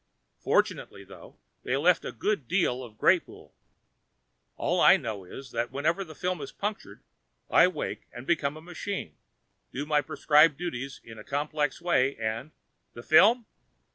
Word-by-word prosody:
Fortunately, 100 - 0
though, 95 -3 -14 0.2
they 125 - -1
left 170 +5 +3
a - - -5
good 205 - -2
deal 130 -8 0
of 110 -3 -12
Greypoole. - - +1 1.0
All - - 0
I - - +7
know 105 -5 -6
is 130 +7 -10
that 120 +1 -2
whenever 155 +7 0
the 160 -4 -12
film 180 -1 -2
is 140 - -7
punctured, 210 +1 -6 0.5
I - - +7
wake 150 - -5
and 120 - -10
become 150 -3 0
a - - -11
machine, 175 - -6 0.6
do 140 +3 -4
my 150 -1 +2
prescribed 150 0 +4
duties 135 -6 -5
in 110 -1 -12
a - - -10
complex 145 +2 -2
way 140 -6 +2
and 110 +5 -3 0.2
" - - -49
"The 120 - -9
film?" 215 - +5
145 Hz, 160 wpm, -28 LUFS, 120-170 Hz, 1.0 s, I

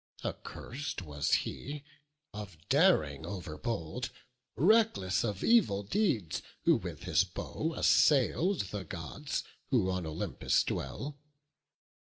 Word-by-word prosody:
Accurs'd 135 -3 -5
was 75 -3 -2 0.2
he, 145 +1 -6 0.5
of 105 -5 -7
daring 135 - +4
over 90 -3 -5
bold, 100 -7 -3 0.5
Reckless 175 - +3
of 105 -4 -2
evil 185 - +4
deeds, 110 - 0 0.2
who - - +5
with - - -7
his - - +3
bow 160 +1 -4
Assail'd 150 - +3
the 105 -2 -3
Gods, 85 - -4 0.3
who 105 -8 +2
on 90 -3 -2
Olympus 80 - 0
dwell. 145 +1 -4
105 Hz, 110 wpm, -32 LUFS, 90-150 Hz, 0.5 s, who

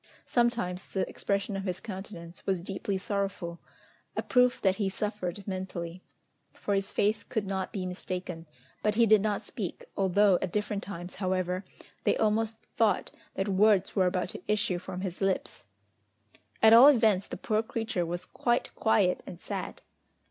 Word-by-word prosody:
Sometimes 235 -7 +1
the 190 - -2
expression 200 0 -1
of 195 0 -3
his 185 -1 -2
countenance 185 -4 -8
was 190 -2 +1
deeply 195 +2 -3
sorrowful, 195 -3 -3 0.6
a - - 0
proof 250 -1 +3
that 190 -1 +2
he 200 -3 0
suffered 200 -1 -4
mentally, 185 -2 -4 0.5
for 205 - -2
his 195 0 0
face 210 0 +1
could 220 -2 -2
not 190 -1 -2
be 190 -3 -3
mistaken; 180 -2 -5 0.3
but 210 0 +1
he 235 +1 +5
did 215 -2 +6
not 210 -1 -1
speak, 195 -7 -5
although 195 0 +4
at 185 - -2
different 205 0 -1
times, 175 -3 -7
however, 185 -1 -1 0.4
they - - +2
almost 220 +1 +1 0.2
thought 225 -2 +2 0.2
that 195 - -1
words 200 0 +3
were 190 -3 +4
about 180 0 -1
to - - -8
issue 210 -4 +1
from 180 +1 -6
his 185 -1 -4
lips. 195 -1 -1 1.0
At 220 0 +9
all 240 +4 +10
events, 220 -8 +4
the - - -6
poor 215 0 +1
creature 225 -5 -2
was 175 +1 -3
quite 240 0 0
quiet 200 -5 +2
and 175 - -8
sad! - - -5
195 Hz, 165 wpm, -29 LUFS, 185-215 Hz, 1.0 s, all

